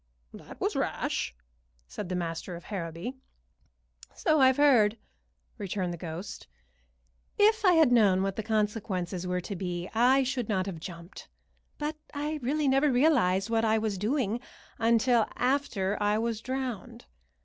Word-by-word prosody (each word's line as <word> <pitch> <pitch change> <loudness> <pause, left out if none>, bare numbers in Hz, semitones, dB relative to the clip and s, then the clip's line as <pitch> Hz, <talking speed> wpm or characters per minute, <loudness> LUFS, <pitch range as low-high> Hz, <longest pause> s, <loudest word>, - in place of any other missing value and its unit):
"That - - -12
was - - -1
rash," - - -2 0.5
said 65 - -6
the 185 - -2
master 170 +1 -4
of 170 - -10
Harrowby. 175 +3 -5 1.0
"So 310 -3 +2
I've 260 0 +5
heard," 235 -7 +4 0.6
returned 185 -2 -2
the - - -6
ghost. 165 +3 -7 0.9
"If 435 +1 +4
I 365 -3 +6
had 320 -6 +5
known 200 -6 +4
what 195 0 -2
the - - -2
consequences 205 -5 -2
were 180 0 -1
to 200 +3 -6
be 180 -1 -4
I 255 +4 +4
should 255 -3 -2
not 190 -3 0
have 185 -5 -5
jumped; 170 +2 -10 0.5
but 305 +1 -3 0.2
I 300 +2 -2
really 290 +4 0
never 270 +2 +3
realized 235 - +3
what 225 0 +2
I 220 0 +3
was 215 -3 -2
doing 230 0 0 0.4
until 230 0 +3
after 240 -7 0
I 205 +1 +2
was 225 -1 -2
drowned. 255 -4 -5
220 Hz, 150 wpm, -28 LUFS, 185-260 Hz, 1.0 s, I